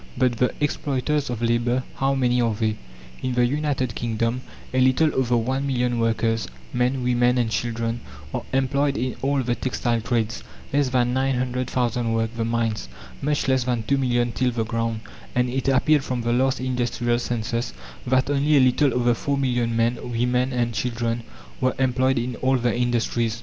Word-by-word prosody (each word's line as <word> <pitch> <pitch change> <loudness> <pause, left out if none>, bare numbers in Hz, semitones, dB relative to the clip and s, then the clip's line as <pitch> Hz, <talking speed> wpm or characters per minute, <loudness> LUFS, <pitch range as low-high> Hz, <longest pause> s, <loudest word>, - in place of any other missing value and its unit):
But 125 -2 +2
the 125 - +3
exploiters 145 0 0
of 120 -1 -3
labour, 120 +2 +1
how 135 +1 +1
many 125 -2 +2
are 115 -2 +1
they? 110 0 0 0.5
In 130 - -1
the 125 0 +4
United 135 -2 -1
Kingdom 115 +1 -1 0.3
a 130 - +2
little 130 +5 +4
over 125 -2 +2
one 130 +4 -1
million 125 -2 0
workers 115 -1 +1 0.3
men, 125 +1 +1
women, 125 0 +3
and 115 -2 +1
children, 115 0 -1 0.3
are - - -1
employed 140 +2 +1
in 125 +2 -2
all 140 0 +1
the 120 0 0
textile 120 -2 -1
trades; 115 -1 -1 0.3
less 140 -2 +2
than 125 -1 +1
nine 135 +1 +1
hundred 125 0 -2
thousand 120 -2 0
work 115 0 -1
the 115 - -1
mines; 115 - -1 0.3
much 145 0 0
less 130 -2 +2
than 120 -3 0
two 140 +4 +1
million 120 -2 +1
till 125 +1 +1
the 115 -2 -1
ground, 115 -1 -2 0.3
and 125 0 +2
it 130 +1 -2
appeared 135 +2 +3
from 125 -2 -2
the 120 0 0
last 130 +2 +2
industrial 120 -2 0
census 120 0 -2 0.4
that 130 +1 +3
only 145 +1 +3
a - - +7
little 130 +1 +3
over 120 -1 +3
four 140 +4 -1
million 120 -3 0
men, 115 +1 +1
women 125 +2 +1
and 120 -2 0
children 115 0 -1 0.4
were 130 -1 +1
employed 130 0 +2
in 120 +1 -2
all 130 0 +2
the 120 -1 0
industries. 120 -2 0
125 Hz, 180 wpm, -24 LUFS, 115-130 Hz, 0.5 s, a